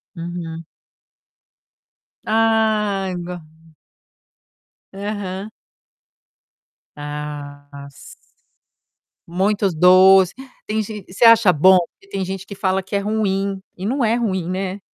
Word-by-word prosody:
Uhum. 165 Hz, -1 st, -6 dB, 1.6 s
Ah, 215 Hz, -3 st, +1 dB
go 175 Hz, 0 st, -6 dB, 1.5 s
Aham. 200 Hz, 0 st, -5 dB, 1.5 s
Ah 145 Hz, -1 st, -8 dB
si 140 Hz, -, -15 dB, 1.1 s
Muitos 195 Hz, +2 st, 0 dB
doce. 185 Hz, +2 st, +6 dB, 0.3 s
Tem 220 Hz, +1 st, -1 dB
gen 210 Hz, -1 st, -7 dB
você 190 Hz, +6 st, +1 dB
acha 230 Hz, -4 st, +7 dB
bom? 185 Hz, +5 st, +6 dB, 0.2 s
E 195 Hz, -, -21 dB
tem 195 Hz, -1 st, -3 dB
gente 190 Hz, +1 st, -6 dB
que 200 Hz, -, -9 dB
fala 190 Hz, 0 st, 0 dB
que 195 Hz, +2 st, -6 dB
é -, -, +2 dB
ruim. 200 Hz, -2 st, -1 dB, 0.2 s
E 185 Hz, -, -6 dB
não 255 Hz, +5 st, 0 dB
é 225 Hz, 0 st, +2 dB
ruim, 190 Hz, -7 st, -2 dB
né. 190 Hz, +1 st, -3 dB
190 Hz, 105 wpm, -20 LUFS, 175-210 Hz, 1.6 s, acha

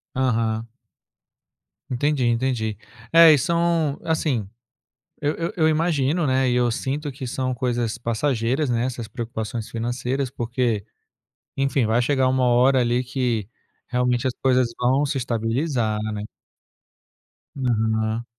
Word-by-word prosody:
Aham. 115 Hz, -3 st, 0 dB, 1.2 s
Entendi, 135 Hz, +1 st, 0 dB
entendi. 115 Hz, -3 st, 0 dB, 0.4 s
É 165 Hz, -1 st, +9 dB
e 150 Hz, -, +6 dB
são 170 Hz, -1 st, +1 dB
assim, 150 Hz, -10 st, 0 dB, 0.7 s
eu 145 Hz, +1 st, 0 dB
eu 170 Hz, 0 st, -3 dB
eu 160 Hz, -2 st, +3 dB
imagino, 155 Hz, 0 st, +1 dB
né, 130 Hz, 0 st, +2 dB
e 125 Hz, -, +1 dB
eu 120 Hz, -1 st, +3 dB
sinto 140 Hz, +4 st, -3 dB
que 130 Hz, -1 st, -7 dB
são 130 Hz, 0 st, -2 dB
coisas 120 Hz, -2 st, -1 dB
passageiras, 120 Hz, +3 st, 0 dB
né, 120 Hz, 0 st, +1 dB
essas 120 Hz, -3 st, -5 dB
preocupações 115 Hz, 0 st, -5 dB
financeiras, 125 Hz, +3 st, -2 dB
porque, 120 Hz, -3 st, -1 dB, 0.7 s
enfim, 135 Hz, -2 st, +1 dB
vai 115 Hz, +3 st, +2 dB
chegar 130 Hz, 0 st, +2 dB
uma 130 Hz, 0 st, +1 dB
hora 125 Hz, +2 st, +4 dB
ali 120 Hz, +1 st, +1 dB
que 120 Hz, -5 st, -1 dB, 0.4 s
realmente 125 Hz, 0 st, +1 dB
as 130 Hz, -, -1 dB
coisas 130 Hz, -2 st, +3 dB
vão 130 Hz, +4 st, +3 dB
se 140 Hz, -1 st, -2 dB
estabilizar, 115 Hz, 0 st, -1 dB, 0.2 s
né. 105 Hz, 0 st, -4 dB, 1.3 s
Aham. 110 Hz, -3 st, 0 dB
125 Hz, 125 wpm, -23 LUFS, 115-135 Hz, 1.3 s, É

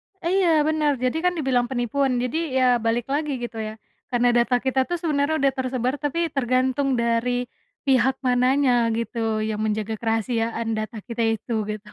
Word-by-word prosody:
E 365 Hz, -3 st, -6 dB
iya, 340 Hz, -3 st, +4 dB
benar. 300 Hz, -3 st, +1 dB
Jadi 255 Hz, +5 st, -1 dB
kan 360 Hz, -, +2 dB
dibilang 255 Hz, -4 st, +1 dB
penipuan. 255 Hz, +1 st, 0 dB
Jadi 260 Hz, +4 st, -2 dB
ya 250 Hz, -2 st, +4 dB
balik 230 Hz, +1 st, 0 dB
lagi, 290 Hz, -2 st, -1 dB
gitu, 240 Hz, -1 st, -6 dB
ya. 215 Hz, 0 st, -6 dB, 0.3 s
Karena 245 Hz, -1 st, +3 dB
data 240 Hz, +1 st, +3 dB
kita 260 Hz, +1 st, 0 dB
tuh 350 Hz, -, -1 dB
sebenarnya 310 Hz, -2 st, 0 dB
udah 275 Hz, -2 st, +2 dB
tersebar, 255 Hz, -1 st, -1 dB
tapi 320 Hz, +2 st, -1 dB
tergantung 260 Hz, +1 st, +1 dB
dari 235 Hz, +1 st, 0 dB, 0.4 s
pihak 265 Hz, 0 st, +3 dB
mananya, 250 Hz, -1 st, +3 dB
gitu, 225 Hz, -1 st, -2 dB
yang 215 Hz, -1 st, -2 dB
menjaga 215 Hz, 0 st, -1 dB
kerahasiaan 225 Hz, 0 st, -1 dB
data 215 Hz, +1 st, -4 dB
kita 235 Hz, -1 st, -3 dB
itu, 225 Hz, 0 st, -1 dB
gitu. 210 Hz, 0 st, -6 dB
250 Hz, 165 wpm, -23 LUFS, 230-275 Hz, 0.4 s, iya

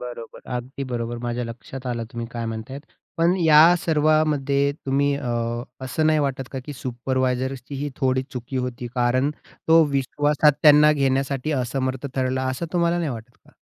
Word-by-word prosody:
बरोबर. 120 Hz, -2 st, -8 dB, 0.2 s
अगदी 130 Hz, +3 st, -6 dB
बरोबर 120 Hz, -2 st, -4 dB
माझ्या 120 Hz, 0 st, -2 dB
लक्षात 125 Hz, +3 st, -8 dB
आलं 120 Hz, -2 st, -2 dB
तुम्ही 120 Hz, 0 st, -4 dB
काय 115 Hz, -1 st, -4 dB
म्हणतायत. 115 Hz, +5 st, -6 dB, 0.4 s
पण 170 Hz, +2 st, +3 dB
या 160 Hz, +2 st, +7 dB
सर्वामध्ये 150 Hz, -3 st, +2 dB
तुम्ही 140 Hz, +1 st, +2 dB
अ, 135 Hz, -4 st, -4 dB, 0.5 s
असं 155 Hz, +4 st, 0 dB
नाही 155 Hz, 0 st, +3 dB
वाटत 135 Hz, -3 st, -2 dB
का? 135 Hz, -, -3 dB
की 145 Hz, -, -6 dB
सुपरवायझर्सची 130 Hz, +1 st, -2 dB
ही 145 Hz, +1 st, -3 dB
थोडी 130 Hz, -1 st, +1 dB
चुकी 130 Hz, 0 st, -6 dB
होती. 125 Hz, -1 st, -3 dB
कारण 125 Hz, +3 st, +2 dB, 0.4 s
तो 165 Hz, 0 st, +7 dB
विश्वासात 145 Hz, +2 st, +2 dB
त्यांना 150 Hz, 0 st, +7 dB
घेण्यासाठी 135 Hz, 0 st, 0 dB
असमर्थ 130 Hz, +1 st, -3 dB
ठरला 130 Hz, 0 st, 0 dB
असं 130 Hz, +6 st, -4 dB
तुम्हाला 170 Hz, 0 st, +1 dB
नाही 165 Hz, -4 st, -1 dB
वाटत 120 Hz, 0 st, -9 dB
का? -, -, -21 dB
135 Hz, 160 wpm, -23 LUFS, 125-145 Hz, 0.5 s, या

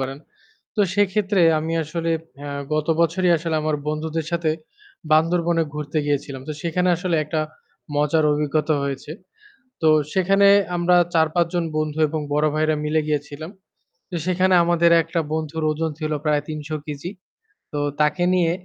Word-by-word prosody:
পারেন। 135 Hz, +1 st, -4 dB, 0.6 s
তো -, -, +2 dB
সেক্ষেত্রে 205 Hz, -1 st, +2 dB, 0.2 s
আমি 160 Hz, +1 st, -3 dB
আসলে 165 Hz, +2 st, -3 dB, 0.4 s
আ -, -, -5 dB, 0.3 s
গত 155 Hz, -1 st, 0 dB
বছরই 180 Hz, +2 st, +2 dB
আসলে 165 Hz, 0 st, -3 dB
আমার 155 Hz, -1 st, 0 dB
বন্ধুদের 155 Hz, +1 st, -3 dB
সাথে 170 Hz, -2 st, +1 dB, 0.6 s
বান্দরবনে 165 Hz, +1 st, +3 dB
ঘুরতে 150 Hz, +1 st, -3 dB
গিয়েছিলাম। 140 Hz, -2 st, -2 dB
তো -, -, -2 dB
সেখানে 180 Hz, +2 st, 0 dB
আসলে 175 Hz, -1 st, -1 dB
একটা 155 Hz, +1 st, -2 dB, 0.6 s
মজার 150 Hz, +2 st, +2 dB
অভিজ্ঞতা 150 Hz, +1 st, 0 dB
হয়েছে। 140 Hz, +1 st, -4 dB, 0.7 s
তো 160 Hz, -, +5 dB, 0.2 s
সেখানে 195 Hz, +2 st, +4 dB, 0.3 s
আমরা 175 Hz, +1 st, +3 dB, 0.2 s
৪-৫ 165 Hz, +1 st, +3 dB
জন 175 Hz, -, +1 dB
বন্ধু 155 Hz, 0 st, -2 dB
এবং 155 Hz, +1 st, -3 dB
বড় 150 Hz, +1 st, +2 dB
ভাইয়েরা 155 Hz, 0 st, +1 dB
মিলে 155 Hz, +1 st, +1 dB
গিয়েছিলাম। 150 Hz, +2 st, -3 dB, 0.6 s
তো 175 Hz, -, -4 dB
সেখানে 185 Hz, +1 st, +2 dB
আমাদের 170 Hz, 0 st, +3 dB
একটা 165 Hz, +2 st, -2 dB
বন্ধুর 160 Hz, 0 st, -3 dB
ওজন 160 Hz, +1 st, -1 dB
ছিল 155 Hz, -1 st, -3 dB
প্রায় 150 Hz, -1 st, +2 dB
৩০০ 155 Hz, -2 st, -6 dB, 0.2 s
কেজি। 150 Hz, +4 st, -6 dB, 0.6 s
তো 145 Hz, -, -1 dB, 0.2 s
তাকে 150 Hz, +4 st, +2 dB
নিয়ে 170 Hz, -2 st, +2 dB
160 Hz, 150 wpm, -22 LUFS, 150-170 Hz, 0.7 s, তো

